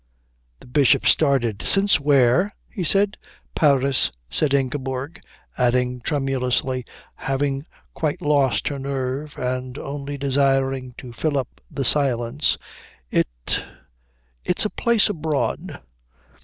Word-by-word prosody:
The -, -, -14 dB
Bishop 130 Hz, +1 st, +3 dB
started. 130 Hz, -9 st, +3 dB
"Since 200 Hz, -3 st, +3 dB
where?" 140 Hz, +7 st, +3 dB, 0.2 s
he 185 Hz, -, -3 dB
said. 200 Hz, +4 st, +2 dB, 0.4 s
"Paris," 140 Hz, -3 st, +3 dB, 0.2 s
said 150 Hz, -, +1 dB
Ingeborg; 135 Hz, +1 st, -2 dB, 0.4 s
adding 125 Hz, 0 st, +1 dB
tremulously, 130 Hz, -2 st, -1 dB, 0.3 s
having 135 Hz, +2 st, -2 dB, 0.3 s
quite 155 Hz, -2 st, -2 dB
lost 145 Hz, -3 st, +2 dB
her 140 Hz, -1 st, -4 dB
nerve 135 Hz, +2 st, -3 dB
and 125 Hz, +1 st, -3 dB
only 140 Hz, 0 st, -5 dB
desiring 135 Hz, -2 st, +1 dB
to 125 Hz, -2 st, -9 dB
fill 145 Hz, +5 st, -1 dB
up 130 Hz, -3 st, -5 dB
the 135 Hz, -, -3 dB
silence, 130 Hz, 0 st, +2 dB, 0.5 s
"it -, -, +2 dB, 1.2 s
it's 180 Hz, -, +2 dB
a 210 Hz, -, -1 dB
place 235 Hz, -3 st, +3 dB
abroad." 160 Hz, -7 st, -2 dB
135 Hz, 110 wpm, -22 LUFS, 130-150 Hz, 1.2 s, Bishop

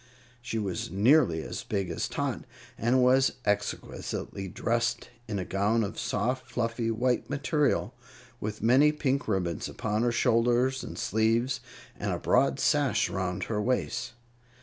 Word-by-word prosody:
She 115 Hz, -2 st, -4 dB
was 100 Hz, -9 st, -2 dB
nearly 100 Hz, -, +4 dB
as -, -, -5 dB
big 100 Hz, -3 st, -2 dB
as -, -, -2 dB
Tot, -, -, -3 dB, 0.3 s
and 125 Hz, +3 st, +2 dB
was 130 Hz, +1 st, +4 dB
exquisitely 100 Hz, -1 st, -3 dB
dressed 115 Hz, +4 st, -1 dB, 0.2 s
in 105 Hz, -2 st, -3 dB
a 95 Hz, -, -3 dB
gown 105 Hz, +4 st, +1 dB
of 100 Hz, +1 st, -4 dB
soft, 125 Hz, +4 st, -1 dB
fluffy 115 Hz, -1 st, -1 dB
white 125 Hz, +2 st, 0 dB
material, 145 Hz, +1 st, 0 dB, 0.5 s
with 105 Hz, 0 st, -5 dB
many 135 Hz, +6 st, +5 dB
pink 140 Hz, -2 st, -1 dB
ribbons 90 Hz, -6 st, -1 dB
upon 110 Hz, 0 st, -2 dB
her 120 Hz, 0 st, +2 dB
shoulders 120 Hz, +2 st, +2 dB
and -, -, -7 dB
sleeves, 115 Hz, +5 st, +1 dB, 0.4 s
and -, -, -1 dB
a -, -, -1 dB
broad -, -, +2 dB
sash -, -, +2 dB
around 95 Hz, 0 st, -2 dB
her 105 Hz, -2 st, -2 dB
waist. 125 Hz, +3 st, -1 dB
115 Hz, 145 wpm, -28 LUFS, 105-125 Hz, 0.5 s, many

